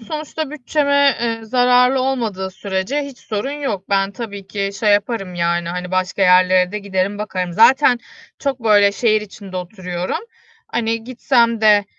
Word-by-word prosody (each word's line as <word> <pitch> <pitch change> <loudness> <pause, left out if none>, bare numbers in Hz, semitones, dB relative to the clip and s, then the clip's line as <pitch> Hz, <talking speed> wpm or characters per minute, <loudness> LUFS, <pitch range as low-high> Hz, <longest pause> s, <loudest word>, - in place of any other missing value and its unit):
sonuçta 305 +3 -5
bütçeme, 285 -1 +2
eee, 230 -1 -1
zararlı 250 +2 +3
olmadığı 225 -8 -2
sürece 195 +9 -3
hiç 280 -3 -9
sorun 215 +4 -4
yok. 270 -10 -4
Ben 195 0 +2
tabii 200 -3 -7
ki 195 0 -3
şey 210 -2 +3
yaparım, 205 -3 -1
yani, 170 0 -1
hani, 180 +1 -5
başka 185 +1 -1
yerlere 185 0 +4
de 210 - -2
giderim 200 0 -2
bakarım. 185 -4 -3
Zaten 250 - +5 0.4
çok 275 -3 -2
böyle 205 -2 +5
şehir 215 -1 +2
içinde 200 -2 -10
oturuyorum. 180 - -4 0.5
Hani, 225 -1 -2
gitsem 235 -2 +1
de, 210 -2 +5
210 Hz, 150 wpm, -19 LUFS, 190-250 Hz, 0.5 s, Zaten